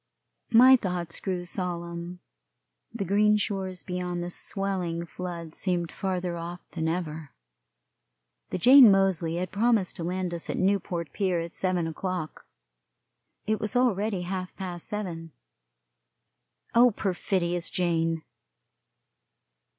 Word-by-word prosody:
My 250 +3 +8
thoughts 180 -7 -2
grew 180 -2 -3
solemn. 175 0 -4 0.7
The 220 -4 -4
green 210 +3 +4
shores 190 -3 -3
beyond 180 -1 -3
the 175 - -4
swelling 180 -4 -2
flood 170 -2 -7
seemed 175 -3 -1
farther 180 -2 -2
off 170 +1 -6
than 160 -2 -2
ever. 160 -3 -3 1.2
The - - -2
Jane 255 +5 +9
Moseley 190 -4 +2
had 180 +1 -3
promised 220 -2 +1
to 170 - -4
land 180 0 -2
us 170 - -5
at - - -2
Newport 185 -3 0
pier 185 -4 0
at 165 0 -5
seven 185 -3 0
o'clock. 165 0 -4 1.0
It 215 0 0
was 215 +4 -1
already 215 -5 +1
half 185 0 -4
past 180 -3 -5
seven; 175 -7 -5 1.4
oh, 245 +2 +7
perfidious 180 -4 -1
Jane! 165 -2 0
180 Hz, 120 wpm, -27 LUFS, 170-195 Hz, 1.4 s, Jane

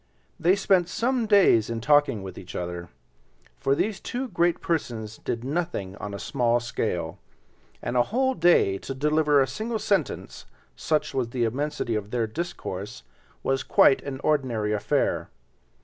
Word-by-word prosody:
They 175 +4 +4
spent 190 -3 +2
some 240 +3 0
days 190 - +5
in 115 -1 -2
talking 145 -5 +3
with 95 - -7
each 90 - -10
other—for 85 - -5
these 205 +4 -1
two 255 +1 -4
great 170 -2 +1
persons 115 -10 -3
did 115 0 -3
nothing 135 - -3
on 100 -1 -6
a - - -4
small 120 +1 +1
scale, 90 -8 -3 0.6
and 120 - -3
a 125 - +5
whole 260 +4 +2
day 165 - +3
to 135 - -6
deliver 150 +1 +3
a 135 - +4
single 220 - -3
sentence, 195 -7 -2 0.3
such 155 -1 -1
was 130 -3 -1
the 120 0 -1
immensity 135 +1 -1
of 105 -2 -3
their 120 0 0
discourse, 110 - -5 0.4
was 135 0 +1
quite 135 - +4
an 135 -2 -6
ordinary 120 -8 +1
affair. 105 0 0
135 Hz, 150 wpm, -26 LUFS, 110-170 Hz, 0.6 s, days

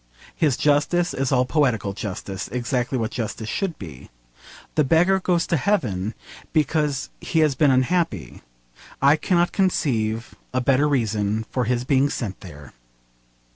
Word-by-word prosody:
His 150 -6 +1
justice 150 +4 +2
is 135 -1 -1
all 125 -1 +3
poetical 125 -9 +1
justice, 100 -3 -5
exactly 125 +2 -2
what 115 -2 -2
justice 110 -1 -4
should 190 - -2
be. 80 -10 -10 0.6
The 155 - +3
beggar 175 +7 +3
goes 175 -3 +1
to 170 - +1
heaven 115 - -1 0.4
because 150 -3 0
he 160 - 0
has 155 -2 +3
been 145 +2 +3
unhappy. 130 - 0 0.6
I 140 +2 +5
cannot 175 +2 +1
conceive 115 - 0 0.2
a - - +3
better 135 +3 +3
reason 110 -4 0
for 125 -2 0
his 120 +1 0
being 135 +1 +2
sent 105 -9 -4
there. 75 -7 -12
130 Hz, 140 wpm, -23 LUFS, 110-155 Hz, 0.6 s, I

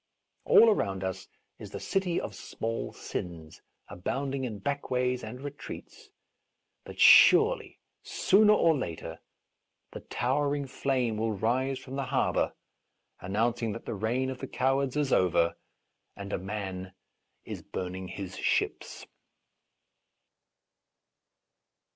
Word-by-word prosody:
All 225 -1 +7
around 95 - -1
us 95 0 -4 0.3
is - - -8
the - - -7
city 185 -3 0
of 105 - -5
small 115 +3 -4
sins, 80 -3 -7 0.3
abound 135 +10 -3
ing 135 -1 -2
in 110 -4 -5
backways 125 0 -1
and 115 +3 -7
retreats, 145 - -9 0.7
but - - -11
surely, 485 +4 +7 0.2
sooner 210 +2 +4
or 165 -6 +4
later, 85 - -5 0.7
the - - -7
towering 140 +3 -1
flame 130 -4 -1
will 110 0 0
rise 125 +6 0
from 130 +1 -8
the 135 - -1
harbour - - 0 0.6
announcing 115 +4 -1
that 115 - -8
the - - -4
reign 120 +6 -1
of 130 - -7
the - - -5
cowards 135 +1 0
is 145 -3 +1
over 85 -2 +3 0.6
and 100 0 -7
a - - -1
man 95 -1 -5 0.5
is - - -6
burn 90 -1 -5
ing 95 0 -6
his 95 0 -7
ships. - - -1
120 Hz, 125 wpm, -29 LUFS, 95-140 Hz, 0.7 s, All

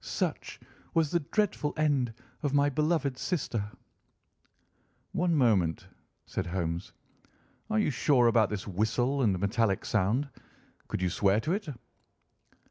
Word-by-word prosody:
Such - - -3 0.4
was 160 -3 +2
the 170 - +2
dreadful 170 -2 -1
end 140 -7 +1 0.3
of 145 -2 0
my 145 0 +4
beloved 150 -3 0
sister." 125 - -2 1.5
"One 175 -1 +1
moment," 100 - +2 0.4
said 95 - -3
Holmes, 85 0 -3 0.8
"are 215 - +1
you 210 -8 +2
sure 130 -1 +3
about 115 -3 +4
this 105 -3 -4
whistle 120 +8 0
and 100 -7 +2
metallic 100 +1 0
sound? 110 +7 +1 0.6
Could 90 - -3
you 90 - +2
swear 100 +2 +3
to 160 - -1
it?" 205 -2 -3
125 Hz, 125 wpm, -29 LUFS, 100-150 Hz, 1.5 s, my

